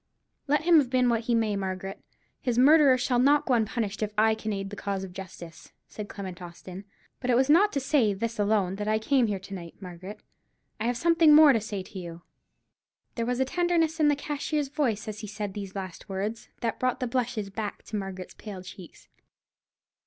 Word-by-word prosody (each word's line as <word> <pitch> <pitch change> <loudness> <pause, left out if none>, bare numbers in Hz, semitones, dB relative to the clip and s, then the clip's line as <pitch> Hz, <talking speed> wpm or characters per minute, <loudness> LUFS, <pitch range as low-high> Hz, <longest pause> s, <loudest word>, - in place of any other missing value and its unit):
"Let 295 +2 +2
him 335 -1 +6
have 270 -4 0
been 255 -1 +3
what 230 -1 0
he 235 - +2
may, 220 -2 +1
Margaret, 190 0 -5 0.4
his 245 -4 -1
murderer 280 0 +6
shall 245 0 +1
not 285 +3 +4
go 265 - +1
unpunished 220 -2 -1
if 210 -1 -1
I 220 +1 +4
can 220 0 -4
aid 195 -1 -4
the - - -6
cause 200 -1 -3
of 185 -2 -8
justice," 175 -3 -10
said 210 -1 -8
Clement 185 -3 -7
Austin. 180 +2 -9 0.3
"But 250 - -4
it 245 - +4
was 265 +3 +3
not 405 +7 +5
to 280 - +1
say 265 -5 +2
this 225 +3 -4
alone 200 -2 +1
that 210 0 -4
I 215 0 +2
came 245 +2 +2
here 205 -2 -1
to 195 +1 -10
night, 170 -3 -8
Margaret. 185 +2 -9 0.6
I 220 - -2
have 245 0 0
something 330 0 +5
more 305 -2 +8
to 225 - +1
say 205 -3 -5
to 190 +1 -9
you." 170 -1 -9 0.9
There 230 -1 -2
was 250 0 -1
a 265 - +3
tenderness 335 0 +1
in 305 - +4
the 295 - +4
cashier's 290 0 -2
voice 250 -8 -1
as 215 -1 -5
he 215 - -7
said 205 -1 -5
these 200 -1 -7
last 190 +1 -7
words, 205 +4 -4
that 230 -1 -2
brought 255 +1 0
the 255 - -1
blushes 235 -4 -2
back 210 0 -5
to 215 - -7
Margaret's 195 -2 -5
pale 195 -4 -9
cheeks. 180 -1 -12
220 Hz, 210 wpm, -27 LUFS, 195-260 Hz, 0.9 s, more